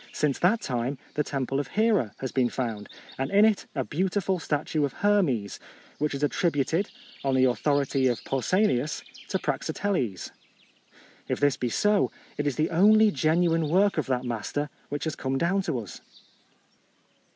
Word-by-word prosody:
Since 145 -3 0
that 205 +6 +3
time 125 +2 -2 0.2
the 150 - 0
temple 135 -1 -2
of 145 - -3
Hera 210 - +1
has 130 - -3
been 125 -2 +2
found, 115 -6 -4 0.3
and 135 +1 -1
in 205 +4 +5
it 220 -2 +1
a 135 - 0
beautiful 185 +5 -1
statue 150 0 -1
of 140 -3 -1
Her 205 0 +3
mes, 115 - -2 0.4
which 150 -1 0
is 140 - -4
attributed, 160 +3 +1 0.3
on 135 -1 +1
the 130 0 +4
authority 135 +1 +1
of 120 -2 -1
Pausanias, 145 - +1 0.2
to 190 - 0
Praxiteles. 150 - -2 1.0
If - - -2
this 145 -1 +3
be 125 -2 -2
so, 210 - +2 0.3
it 145 - -2
is 140 - 0
the 155 - 0
only 210 +5 +6
genuine 165 -2 +2
work 195 +1 +3
of 155 - -2
that 130 -1 0
master 120 +5 -3 0.2
which 145 -1 -3
has 160 - -2
come 135 0 -2
down 185 +6 +1
to 160 -8 -2
us. 105 -7 -8
145 Hz, 165 wpm, -27 LUFS, 130-185 Hz, 1.0 s, only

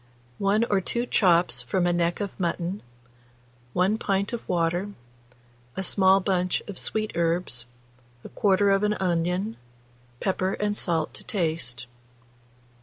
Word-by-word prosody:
1 200 +3 +2
or 205 -4 +1
2 235 +6 -1
chops 175 - +3
from 150 +9 0
a 175 - +2
neck 175 0 0
of 200 -2 -2
mutton, 175 +2 -2 0.9
1 195 +5 +2
pint 200 +1 0
of 235 - -6
water, 175 +2 0 0.9
a 190 - -1
small 190 +1 +4
bunch 185 -2 0
of 205 -3 -7
sweet 215 -1 0
herbs, 165 -7 -1 0.6
1/4 200 0 +3
of 195 - 0
an 210 0 +1
onion, 180 +3 -1 0.6
pepper 190 0 0
and 205 0 -1
salt 165 -6 -1
to - - -8
taste. 160 - -2
185 Hz, 130 wpm, -26 LUFS, 170-200 Hz, 0.9 s, small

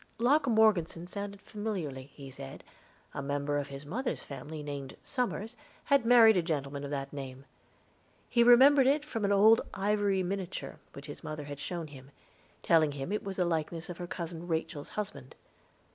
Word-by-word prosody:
Locke 275 +6 +3
Morgeson 210 -7 +3
sounded 200 +2 -7
familiarly, 180 -12 -4
he 135 -2 -10
said; 70 - -9 0.5
a - - -4
member 145 +1 -1
of 145 - -4
his 140 +1 -8
mother's 240 - -3
family 150 +3 -7
named 140 -2 -6
Somers 245 -3 -2 0.3
had 280 -5 +3
married 230 -3 +8
a - - +4
gentleman 145 -4 -3
of 140 - -5
that 140 -1 -4
name. 135 -1 -7 0.8
He 235 - +2
remembered 260 +3 +7
it 290 +2 +2
from 225 -8 -2
an 200 - +1
old 215 +3 +6
ivory 200 -1 +1
miniature 190 0 -4
which 140 - -10
his 145 - -9
mother 155 -1 -5
had 145 0 -8
shown 170 +2 -4
him, 135 -3 -12 0.5
telling 155 -3 +4
him 140 +5 -5
it 210 - -1
was 195 -1 -5
the 180 - +1
likeness 165 0 -2
of 175 - -7
her 175 - -5
cousin 170 -1 -6
Rachel's 160 -2 -3
husband. 140 -11 -6
170 Hz, 175 wpm, -31 LUFS, 145-210 Hz, 0.8 s, married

